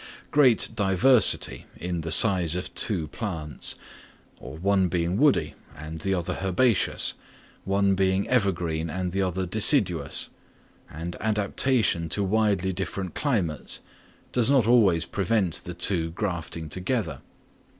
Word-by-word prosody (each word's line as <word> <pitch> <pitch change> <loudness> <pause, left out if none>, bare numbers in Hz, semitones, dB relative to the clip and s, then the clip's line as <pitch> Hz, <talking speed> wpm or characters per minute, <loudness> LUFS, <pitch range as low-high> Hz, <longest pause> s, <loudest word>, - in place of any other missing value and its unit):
Great 135 -6 +4
diversity 110 +5 +3
in 85 +2 -4
the 80 - -5
size 90 -2 +5
of 90 - -5
two 90 -8 -1
plants, 80 - -3 0.6
one 95 +4 0
being 85 +1 -1
woody 100 - +2 0.2
and 80 +1 -8
the 95 - -2
other 90 -3 -2
herbaceous, 95 +4 +1 0.5
one 100 0 +1
being 95 +1 0
evergreen 85 -9 -1
and 90 +1 -3
the 95 +2 -1
other 95 0 -2
deciduous, 90 - +2 0.6
and 85 +3 -7
adaptation 105 -3 0
to 100 - +1
widely 100 -2 0
different 95 0 -5
climates, 100 - -2 0.5
does 125 -1 +2
not 135 -5 +3
always 105 -8 +3
prevent 100 -2 -1
the 90 - -6
two 90 -2 0
grafting 85 -4 -5
together. 90 - -3
95 Hz, 120 wpm, -25 LUFS, 85-105 Hz, 0.6 s, size